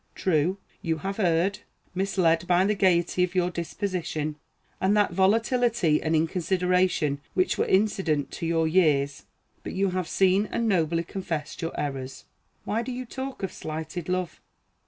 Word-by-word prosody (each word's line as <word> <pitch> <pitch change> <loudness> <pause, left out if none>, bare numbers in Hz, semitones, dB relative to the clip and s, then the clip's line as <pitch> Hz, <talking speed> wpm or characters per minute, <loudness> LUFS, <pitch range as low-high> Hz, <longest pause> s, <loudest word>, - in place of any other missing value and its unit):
True, 180 +1 +1 0.2
you 165 -1 -1
have 195 +6 -4
erred; 185 +2 +2 0.3
misled 180 -3 +1
by 180 +1 +4
the 210 - +2
gayety 180 -2 +2
of 180 +1 -2
your 180 -1 +2
disposition, 170 -3 -3 0.5
and 195 +3 +3
that 205 - +3
volatility 220 -2 +2
and 160 0 0
inconsideration 180 -2 +1
which 185 - +1
were - - +2
incident 190 -7 +1
to 165 - -4
your 165 -1 +2
years; 150 -5 +2 0.4
but - - -6
you 195 0 +1
have 185 -2 -2
seen 195 +2 +3
and 235 - 0
nobly 170 -4 +1
confessed 170 -5 -5
your 165 - -4
errors. 135 -2 -4 0.4
Why 220 +2 0
do 255 - -5
you 255 +1 -5
talk 265 -1 -6
of 190 - -3
slighted 160 +2 -5
love? 185 -1 -2
180 Hz, 155 wpm, -26 LUFS, 160-195 Hz, 0.5 s, by